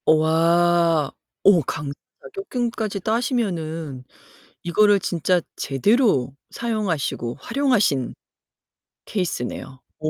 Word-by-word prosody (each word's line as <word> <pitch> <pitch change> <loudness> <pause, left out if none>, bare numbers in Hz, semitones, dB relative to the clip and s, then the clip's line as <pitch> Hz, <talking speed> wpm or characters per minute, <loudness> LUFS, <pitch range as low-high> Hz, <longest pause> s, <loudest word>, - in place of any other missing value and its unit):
와 165 0 +3 0.3
어 195 -4 +6
강사 145 +2 -4 0.3
자격증까지 235 - -3
따시면은 175 - -2 0.6
이거를 205 +4 +4
진짜 175 0 +1
제대로 140 - +2 0.2
사용하시고 185 - -2
활용하신 230 - +1 0.9
케이스네요. 135 - -4 0.2
오 155 - -1
175 Hz, 215 characters per minute, -22 LUFS, 155-220 Hz, 0.9 s, 어